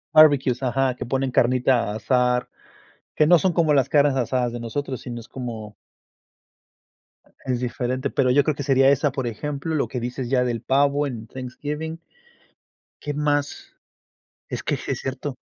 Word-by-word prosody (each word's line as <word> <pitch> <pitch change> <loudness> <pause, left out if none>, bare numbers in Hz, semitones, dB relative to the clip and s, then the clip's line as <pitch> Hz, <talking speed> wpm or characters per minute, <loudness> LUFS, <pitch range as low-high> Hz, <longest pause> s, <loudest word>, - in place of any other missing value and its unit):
Barbecues, 140 -5 +5
ajá, 130 0 +1
que - - -6
ponen 135 +2 -1
carnita 125 -2 +2
a - - -5
asar, 125 +2 +1 0.7
que 155 - +4
no 175 +2 +7
son 180 +2 +1
como 160 -3 +3
las 135 -3 +3
carnes 145 -2 +3
asadas 125 -1 0
de 120 - -5
nosotros, 130 +2 -4
sino 120 -1 -6
es 115 - -12
como 115 -5 -7 1.7
es 130 -2 -1
diferente, 125 +2 -2
pero 130 -2 +2
yo 145 +2 +4
creo 155 - +1
que - - -5
sería 135 0 +4
esa, 140 +1 +2
por 130 -1 -3
ejemplo, 145 +7 -4
lo 150 - 0
que 125 - -4
dices 125 +1 -4
ya 125 -1 +2
del 120 -3 -2
pavo 140 +3 +2
en 115 -5 -6
Thanksgiving. 150 +6 -6 1.0
¿Qué 145 - -3
más? 145 -1 -1 0.8
Es - - -4
que - - 0
sí - - -5
es - - -2
cierto. 135 +1 -4
130 Hz, 170 wpm, -23 LUFS, 125-145 Hz, 1.7 s, no